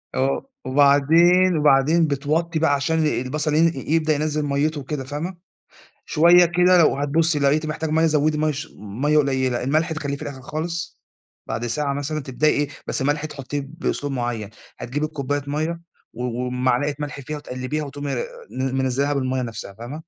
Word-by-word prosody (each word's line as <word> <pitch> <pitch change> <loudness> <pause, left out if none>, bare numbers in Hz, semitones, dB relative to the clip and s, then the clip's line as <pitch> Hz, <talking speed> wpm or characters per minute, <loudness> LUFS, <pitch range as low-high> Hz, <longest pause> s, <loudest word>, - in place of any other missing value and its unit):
آه، 135 - 0 0.2
وبعدين 160 +6 +4
وبعدين 150 +3 +4
بتوطّي 155 +4 -1
بقى 155 -3 +3
عشان 145 +3 0
ال 155 - +2
البَصَل 150 +4 -2
ين 165 +1 +4
يبدأ 155 +3 +1
ينزل 150 0 -1
مَيِّته 145 +2 0
وكده، 135 0 -4
فاهمة، 155 +7 -5 0.7
شوية 175 +3 +6
كده 180 +1 +4
لو 155 -4 +4
هتبُصّي 150 +2 +1
لقيتِ 145 +3 +2
محتاج 155 0 -3
مَيَّة 160 +1 +3
زوّدي 150 0 +2
مَيَّة 155 0 +2
ش 145 +3 -6
مَيَّة 130 +10 0
قليّلة، 130 -4 +1
الملح 155 +5 +1
تخلّيه 145 -3 -3
في - - -10
الآخِر 135 -2 -6
خالص. 165 +5 -5 0.4
بعد 120 - -3
ساعة 140 +4 -1
مثلًا 150 +2 -3
تبدئي 135 +4 +1
إيه، 145 -1 0 0.2
بس - - -2
الملح 145 +2 0
تحُطّيه 145 -1 -4 0.2
بأسلوب 145 -4 -2
معيّن. 120 -4 -3 0.3
هتجيبي 145 +5 -2
الكوباية 145 -2 -3
مَيَّة 155 +4 -2 0.3
و 125 - -5
وبمعلقة 125 +3 0
ملح 145 -1 -5
فيها 150 +3 -5
وتقلِّبيها 145 +2 -4
وتقومي 145 0 -5
آآ - - -2 0.2
ن 130 0 -2
منزّلاها 135 +2 0
بالمَيَّة 130 -1 -1
نَفْسها، 110 -4 -7
فاهمة؟ 120 +8 -8
145 Hz, 165 wpm, -22 LUFS, 135-155 Hz, 0.7 s, شوية